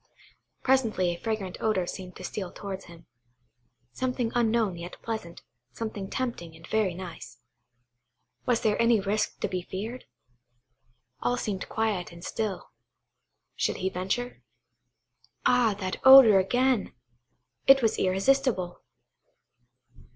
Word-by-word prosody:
Presently 225 -9 +2
a 170 - -9
fragrant 215 -5 -3
odour 215 -5 +1
seemed 180 +1 -7
to - - -10
steal 190 0 -5
towards 195 -1 -7
him,–something 125 - -7
unknown 225 -5 +1
yet 170 +1 -9
pleasant, 220 -7 -5 0.3
something 210 -4 -5
tempting 230 -11 -4
and 165 0 -13
very 210 -5 0
nice. 165 -10 -9 1.1
Was 245 -2 +2
there 215 0 +1
any 230 -1 +4
risk 205 +2 -1
to - - +1
be 185 -2 -3
feared? 215 +8 -6 1.2
All 245 - +1
seemed 205 -6 -4
quiet 215 -6 -1
and 170 0 -11
still. 215 -4 -4 0.8
Should - - -1
he 190 - -1
venture? 195 +7 -3 1.0
Ah, 240 -4 +4
that 185 -2 -3
odour 265 -7 +10
again! 245 +3 +1 0.7
it 270 -1 +7
was 225 -1 +2
irresistible. 195 -1 +1
200 Hz, 115 wpm, -27 LUFS, 180-230 Hz, 1.2 s, odour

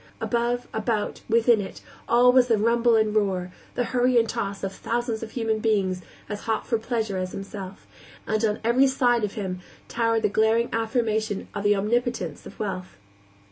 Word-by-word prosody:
Above, 240 +1 -1
about, 220 -1 -2
within 230 -1 +4
it 190 - -8 0.3
all 245 +1 +6
was 250 -1 +5
the 230 -3 +3
rumble 230 +2 +3
and 215 -1 +2
roar, 190 -4 0 0.2
the 245 - +1
hurry 250 0 +2
and 230 -1 +4
toss 200 -2 -3
of 195 0 -2
thousands 235 -1 -2
of 225 - -5
human 225 -2 -1
beings 195 -5 +1 0.3
as 205 -1 -4
hot 225 -1 -1
for 230 - 0
pleasure 220 -4 -2
as 185 0 -3
himself, 195 -1 -7 0.4
and 215 +1 0
on 210 -1 +1
every 245 +4 +4
side 245 -3 +2
of 205 - -1
him 185 -3 -3 0.3
towered 230 -1 +1
the - - +5
glaring 220 +3 +2
affirmation 220 -2 -1
of 205 - -4
the 205 0 +4
omnipotence 215 -5 -1
of - - -13
wealth. 190 -3 -4
220 Hz, 180 wpm, -25 LUFS, 205-235 Hz, 0.4 s, all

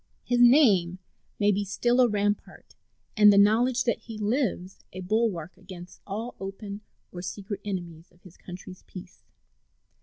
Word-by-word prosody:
His 245 -1 0
name 220 - +5 0.4
may 205 0 +3
be 205 +1 -1
still 240 +5 +1
a 250 - +5
rampart, 205 0 -3 0.4
and 210 -2 +7
the 200 - +3
knowledge 235 +5 +3
that 235 - -1
he 225 -1 -10
lives 210 -4 -2
a 185 - -8
bulwark, 190 -4 -1
against 185 -2 -12
all 220 +5 -5
open 200 +1 -7 0.3
or 175 - -8
secret 195 +3 -6
enemies 175 -4 -6
of 175 0 -28
his 180 -2 -16
country's 180 0 -11
peace. 180 -1 -12
200 Hz, 150 wpm, -26 LUFS, 185-225 Hz, 0.4 s, and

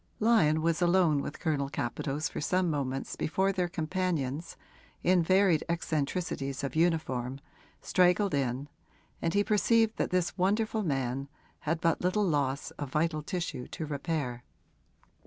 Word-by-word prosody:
Lyon 160 -9 +4
was 165 +1 +1
alone 175 -4 +4
with 145 - -6
Colonel 145 -5 0
Capadose 140 +4 -2
for - - -5
some 180 +2 +1
moments 135 -2 -2
before 190 +5 +1
their 185 -2 0
companions, 165 -4 -2 0.5
in 180 0 +4
varied 185 -1 +3
eccentricities 150 -3 -2
of 140 - -3
uniform, 140 -6 0 0.4
straggled 180 +1 +3
in, 135 0 -1 0.5
and 165 +3 0
he 205 - +4
perceived 225 +1 +3
that - - 0
this 180 -2 0
wonderful 215 +4 +1
man 135 -5 -1 0.4
had 165 0 +1
but 165 0 +1
little 195 +4 +2
loss 140 -3 0
of 145 - -3
vital 155 +2 0
tissue 165 -5 -4
to 160 - -5
repair. 140 -4 -3
160 Hz, 140 wpm, -30 LUFS, 140-185 Hz, 0.5 s, Lyon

